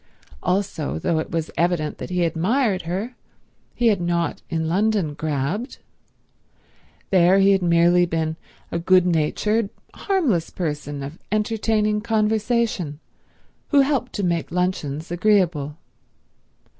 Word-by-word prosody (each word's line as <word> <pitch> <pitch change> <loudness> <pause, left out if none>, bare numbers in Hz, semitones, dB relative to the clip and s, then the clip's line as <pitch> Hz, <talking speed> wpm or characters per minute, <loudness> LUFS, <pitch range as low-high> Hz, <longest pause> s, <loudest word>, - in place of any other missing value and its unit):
Also, 180 - -1
though 160 - 0
it - - -4
was 165 -1 -3
evident 170 -3 0
that - - -6
he 180 -1 0
admired 190 +5 +1
her, 200 +8 -3 0.6
he 240 - 0
had 200 -4 +1
not 170 -1 -1
in 160 -2 -1
London 195 -2 +1
grabbed. 155 - -3 1.3
There 185 0 +5
he 195 0 +5
had 195 -1 +3
merely 175 +1 +4
been 160 -1 -1 0.4
a 170 - -1
good 185 +1 +4
natured, 195 +6 +1 0.2
harmless 280 - 0
person 150 -4 -4
of 145 +5 -8
entertaining 215 0 +1
conversation, 220 -7 0 0.7
who 285 -2 +5
helped 270 -3 0
to 205 - -2
make 170 -2 -1
luncheons 165 -4 -2
agreeable. 175 -6 +1
180 Hz, 120 wpm, -22 LUFS, 160-215 Hz, 1.3 s, There